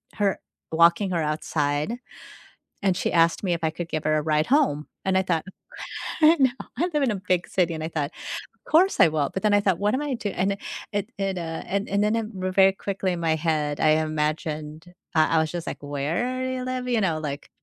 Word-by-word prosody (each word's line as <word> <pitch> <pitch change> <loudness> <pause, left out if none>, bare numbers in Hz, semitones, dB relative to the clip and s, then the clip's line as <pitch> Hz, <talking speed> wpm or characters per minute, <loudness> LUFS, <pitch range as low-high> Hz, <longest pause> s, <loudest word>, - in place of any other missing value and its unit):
her 200 -2 +1 0.3
walking 170 +4 +4
her 170 -2 0
outside, 150 +5 -1 0.9
and 190 -2 +3
she - - -1
asked 165 +2 +3
me 180 -3 +2
if 165 -1 -4
I 160 - +2
could 170 +1 -6
give 155 -1 -2
her 155 0 +2
a - - -1
ride 155 0 +1
home, 255 - +2 0.2
and 190 - +2
I - - +3
thought, 170 -4 0 0.8
No, 305 -4 +6 0.3
I 350 - +2
live 295 -2 +2
in 250 - +2
a 195 -3 -4
big 180 -1 +2
city, 175 -3 +1
and 155 - -5
I 160 - -3
thought, 150 -3 -2 0.5
"Of - - -18
course 365 +5 +5
I - - +9
will," 155 -3 0
but 190 - -2
then 210 -1 +4
I 205 - +5
thought, 190 -4 +1
"What 205 +3 +1
am 270 - 0
I 290 -3 -2
do" 215 -4 -3
And 190 +1 0
then 200 - -5 0.3
it 205 -1 -2
it, 195 -1 -1
uh 165 -1 -4
and 200 +2 -2
and 200 +1 +1
then 215 +2 +2
it 225 -2 -1
ver 185 0 -2
very 190 0 +6
quickly 195 -1 -2
in 170 - -4
my 160 -1 +1
head, 150 -2 0
I 155 - +5
imagined 155 +1 -3 0.2
uh, 155 -1 +4
I 165 - +4
was 160 -1 0
just 175 -1 -4
like, - - -5
"Where 160 - -2
do 260 - -2
you 255 -1 -3
live?" 255 0 -3
You 240 -3 +2
know, 165 -5 +1
like, 145 -1 -5
175 Hz, 240 wpm, -25 LUFS, 155-205 Hz, 0.9 s, I